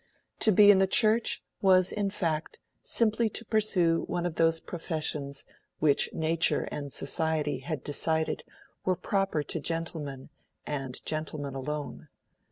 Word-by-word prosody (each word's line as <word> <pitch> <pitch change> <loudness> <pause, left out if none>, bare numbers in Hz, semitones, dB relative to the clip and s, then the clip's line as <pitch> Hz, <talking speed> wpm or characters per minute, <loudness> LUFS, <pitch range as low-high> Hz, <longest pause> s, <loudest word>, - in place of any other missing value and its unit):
To 220 - +4
be 205 +1 +8
in 195 - +4
the 190 - +3
Church 220 +3 +2 0.2
was 185 -2 +4
in 205 -2 -1
fact 165 -5 -2 0.2
simply 225 0 +1
to 230 - -4
pursue 190 -7 +2
one 175 0 -2
of 175 - -2
those 165 0 +2
professions 155 -5 -2 0.3
which 150 -2 +3
Nature 160 +1 +1
and 145 -1 -5
Society 150 -1 0
had 140 +1 -5
decided 160 +2 0 0.4
were 185 - +1
proper 195 -6 -1
to 165 - -2
gentlemen 155 -4 -3 0.4
and 135 -3 -4
gentlemen 155 -3 -3
alone. 145 +2 -5
165 Hz, 135 wpm, -28 LUFS, 150-190 Hz, 0.4 s, be